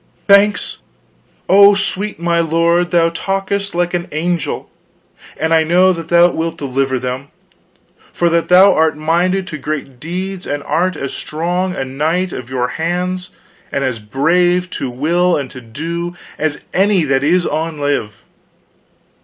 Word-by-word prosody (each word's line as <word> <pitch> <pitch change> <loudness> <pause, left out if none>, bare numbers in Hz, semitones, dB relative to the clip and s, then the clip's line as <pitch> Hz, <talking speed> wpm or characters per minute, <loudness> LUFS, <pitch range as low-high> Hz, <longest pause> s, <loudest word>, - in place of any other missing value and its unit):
"Thanks, 200 +1 +4 0.7
oh, 200 +1 +7
sweet 200 +1 -3
my 170 0 +1
lord, 170 +2 +2
thou 170 -1 +3
talkest 195 +2 -2
like 175 0 0
an 175 -1 -2
angel. 170 +2 -2 0.7
And 160 +1 0
I 160 -1 +4
know 180 +3 +4
that 165 -2 -7
thou 175 0 +5
wilt 165 +1 -3
deliver 135 -1 -1
them, 125 +2 -4 0.8
for 175 - 0
that 170 -1 +1
thou 185 +2 +7
art 160 -1 +2
minded 175 +5 +1
to 155 - -6
great 140 -4 -5
deeds 185 +4 -5
and 145 0 -3
art 175 +6 0
as 140 - -5
strong 180 +4 -2
a 135 - -3
knight 160 +7 -1
of 125 -1 -7
your 125 -1 -1
hands 180 +2 -2 0.4
and 140 - -1
as 130 -4 -2
brave 175 +10 +1
to 130 - -4
will 170 +8 +1
and 140 -3 -5
to 130 - -10
do, 165 +9 -5 0.2
as 155 -1 -1
any 195 -1 +3
that 135 -2 +1
is 175 +4 +2
on 160 0 -2
live." 140 -8 -2
170 Hz, 155 wpm, -16 LUFS, 145-180 Hz, 0.8 s, oh